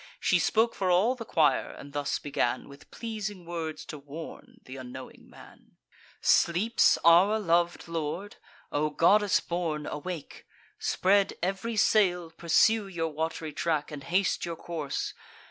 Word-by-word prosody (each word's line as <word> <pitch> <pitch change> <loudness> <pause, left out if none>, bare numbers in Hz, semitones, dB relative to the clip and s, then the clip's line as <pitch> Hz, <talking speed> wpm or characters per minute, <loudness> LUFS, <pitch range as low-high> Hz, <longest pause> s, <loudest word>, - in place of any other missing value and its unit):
She - - +2
spoke 225 +1 +2
for 190 - -1
all 190 +8 +4
the 240 -3 -8
choir, 160 -7 +2
and 140 0 -11
thus 145 -1 -1
began 130 -3 -2
With 140 0 -15
pleasing 210 -5 -6
words 165 -2 -5
to 150 - -8
warn 145 +4 -10
th' - - -18
unknowing 130 0 -9
man: - - -17 0.4
"Sleeps 195 +7 +3
our 180 +6 +6
lov'd 175 -3 +1
lord? 165 +4 -4 0.3
O 150 +1 0
goddess 205 +6 +4
born, 165 -4 -3
awake! 155 +1 -7 0.3
Spread 195 +1 +2
ev'ry 195 +5 -2
sail, 180 -6 +3
pursue 200 +6 +3
your 165 -4 -2
wat'ry 160 0 -3
track, 155 -1 -1
And 145 -2 -8
haste 185 +3 +1
your 170 -1 -3
course. 155 -4 -4
170 Hz, 140 wpm, -28 LUFS, 150-195 Hz, 0.4 s, our